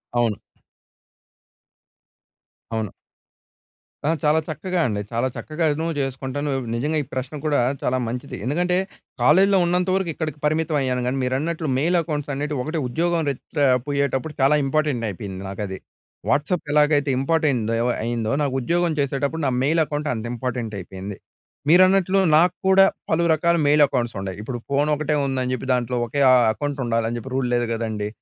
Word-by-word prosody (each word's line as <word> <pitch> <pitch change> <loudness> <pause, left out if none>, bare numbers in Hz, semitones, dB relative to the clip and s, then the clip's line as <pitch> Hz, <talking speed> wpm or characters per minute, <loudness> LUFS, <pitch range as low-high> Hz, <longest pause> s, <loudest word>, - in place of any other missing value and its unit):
అవును. 115 -3 +1 2.4
అవును. 110 -2 -1 1.2
ఆ! - - +2
చాలా 150 +1 +4
చక్కగా 175 +4 -3
అండి. 105 -3 -2
చాలా 120 +2 0
చక్కగాను 155 0 -1
చేసుకుంటాను. 135 +2 -3 0.2
నిజంగా. 145 +7 -1
ఈ - - -13
ప్రశ్న 130 +3 -4
కూడా 150 -2 +2 0.2
చాలా 130 - +1
మంచిది. 125 +2 -5
ఎందుకంటే, 175 +7 +1 0.5
కాలేజీలో 190 +10 +5
ఉన్నంతవరకు 180 +1 +1
ఇక్కడికి 155 -2 -4
పరిమితం 155 0 +1
అయ్యాను 125 -1 0
కానీ, 130 +2 -1
మీరన్నట్లు 155 +6 -1
మెయిల్ 170 +6 +2
అకౌంట్స్ 150 -3 -4
అనేటివి 145 0 -2
ఒకటే 155 +3 -3
ఉద్యోగం 170 +6 0
టా 140 +2 -1 0.2
పోయేటప్పుడు 140 +1 -1
చాలా 135 +3 +5
ఇంపార్టెంట్ 135 -4 0
అయిపోయింది 95 0 -7
నాకు 100 +2 -5
అది. 95 0 -6 0.5
వాట్సాప్ 155 +4 +1
ఎలాగైతే 150 -1 +3
ఇంపార్టెంట్ 135 -6 +1 0.3
అయిందో. 115 -1 -1
నాకు 140 -2 -1
ఉద్యోగం 170 +6 +1
చేసేటప్పుడు 140 +3 -1
నా - - +1
మెయిల్ 160 +4 +3
అకౌంట్ 150 0 -3
అంత 110 -1 -5
ఇంపార్టెంట్ 120 -2 -3
అయిపోయింది. 95 +2 -7 0.5
మీరన్నట్లు 185 +2 +5 0.2
నాకు 175 +2 +4
కూడా 190 0 +7 0.3
పలు 165 +1 +2
రకాల 170 +2 +2
మెయిల్ 150 +1 +5
అకౌంట్స్ 125 -5 -2
ఉన్డాయ్. 95 -1 -5
ఇప్పుడు 120 +3 -4
ఫోన్ 140 +2 +1
ఒకటే 150 0 -1
ఉందని 130 -2 -1
చెప్పి. 130 - -4
దాంట్లో 125 0 -1
ఒకే 140 +5 -2 0.3
అకౌంట్ 145 +3 -4
ఉండాలి 115 -1 0
అని 120 - -3
చెప్పి 130 +3 -7
రూల్ 130 -1 0
లేదు 120 0 +2
కదండీ. 110 -2 -3
140 Hz, 150 wpm, -22 LUFS, 120-160 Hz, 2.4 s, కూడా